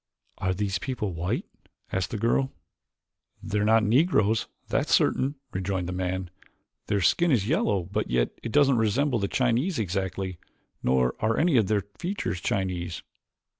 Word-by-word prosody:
"Are 95 0 0
these 100 -1 -1
people 105 -5 -3
white?" 85 +3 -2 0.5
asked 95 -3 -1
the 110 - -3
girl. 120 +5 +1 0.9
"They're 105 0 0
not 110 +1 +4
Negroes, 110 - +3 0.2
that's - - 0
certain," 135 +3 +3 0.2
rejoined 95 -1 -2
the - - -3
man. 95 0 -3 0.6
"Their 100 -2 +1
skin 170 - +3
is 115 -9 +2
yellow, 105 - +1
but 95 +4 -3
yet - - +1
it 115 - -5
doesn't 140 -2 +4
resemble 120 +4 +2
the 100 - 0
Chinese 130 - +1
exactly, 95 -2 -2 0.4
nor 65 0 +2
are 110 0 +1
any 165 -2 +3
of 110 -5 +4
their 105 -1 +1 0.2
features 175 - -3
Chinese." 90 -4 -2
105 Hz, 150 wpm, -27 LUFS, 95-120 Hz, 0.9 s, not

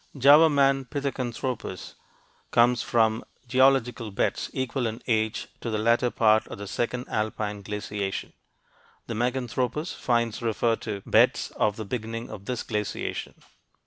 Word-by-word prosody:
Java 145 +5 +7
man, 135 -2 +3
Pithecanthropus, 125 -7 -4 0.6
comes 120 0 +4
from 110 0 +2 0.2
geological 130 -3 +3
beds 100 - -1
equal 130 -1 -1
in 110 +1 -5
age 110 -2 0
to 115 - -4
the 110 - -1
latter 115 +3 +3
part 110 -2 +3
of - - -8
the 100 - -7
second 120 +5 -2
alpine 105 -1 -2
glaciation; 105 -1 -4 0.7
the - - -5
Meganthropus 125 +6 -1
finds 115 -2 0
refer 115 0 +1
to 100 -1 -5
beds - - +3
of 105 -2 +1
the 110 - -6
beginning 115 +1 -5
of 100 -2 -9
this 125 0 -3
glaciation. 105 -1 -3
115 Hz, 135 wpm, -26 LUFS, 110-125 Hz, 0.7 s, Java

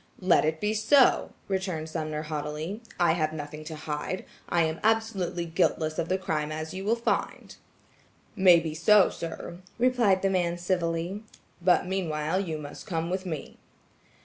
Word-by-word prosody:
"Let 180 -4 +4
it 160 +1 0
be 210 +3 0
so," 245 +5 +4 0.2
returned 185 -5 -2
Sumner 155 -1 -3
haughtily. 155 +6 -4 0.2
"I 175 -2 +4
have 155 -2 0
nothing 150 0 -7
to 160 0 -6
hide. 150 +4 -4 0.2
I 170 -1 +3
am 160 0 -1
absolutely 205 -6 0
guiltless 160 -1 0
of 165 - -2
the 185 - +2
crime 155 -5 -2
as 155 +1 -5
you 190 +1 -5
will 225 +3 +3
find." 235 - -2 0.8
"Maybe 170 -5 +5
so, 190 +5 +5
sir," 170 +1 -7 0.2
replied 235 -6 +3
the 195 - +3
man 175 -2 0
civilly. 175 +1 -1 0.4
"But 180 0 +4
meanwhile 170 -2 -1
you 165 -5 -3
must 145 +5 -9
come 165 -3 -2
with 185 0 -2
me." 160 -4 -6
170 Hz, 155 wpm, -27 LUFS, 155-190 Hz, 0.8 s, Maybe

